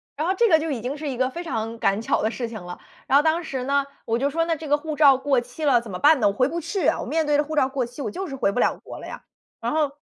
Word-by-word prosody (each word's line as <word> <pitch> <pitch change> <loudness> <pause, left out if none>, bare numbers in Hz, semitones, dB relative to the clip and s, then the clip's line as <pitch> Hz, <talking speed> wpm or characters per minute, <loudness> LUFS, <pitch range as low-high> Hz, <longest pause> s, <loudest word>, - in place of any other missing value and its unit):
然 310 +4 -2
后 375 - +2
这 475 - +4
个 320 -2 +6
就 320 - -3
已 240 -5 -3
经 260 +5 -4
是 300 0 -5
一 255 - -4
个 255 0 +1
非 345 +6 -6
常 225 -6 -4
赶 200 +3 +1
巧 - - 0
的 220 - +1
事 240 0 -4
情 225 -3 -8
了。 180 0 -8 0.3
然 275 - +5
后 295 - +4
当 325 +2 +1
时 265 -5 -4
呢， 280 +1 +1 0.2
我 230 +1 0
就 280 +2 +1
说： 330 +3 0
“那 330 - 0
这 315 0 -8
个 295 +1 +3
护 310 0 -5
照 280 -4 +6
过 270 -1 +1
期 245 +6 -9
了 245 -4 +4
怎 230 - -10
么 180 - -5
办 300 0 +5
呢？ 210 - +3
我 200 - +1
回 255 +5 +2
不 335 +4 -3
去 340 +5 -2
啊。” - - +2
我 - - -5
面 320 0 0
对 295 -1 +2
着 295 - +3
护 310 +1 -5
照 265 -3 +3
过 265 -2 -1
期 245 +4 -9
我 215 - -3
就 380 - -5
是 270 - -6
回 200 -6 +1
不 245 - -2
了 - - +2
国 - - -9
了 - - -9
呀。 - - -9 0.4
然 235 - -1
后， 305 -2 +1
280 Hz, 370 characters per minute, -24 LUFS, 240-315 Hz, 0.4 s, 个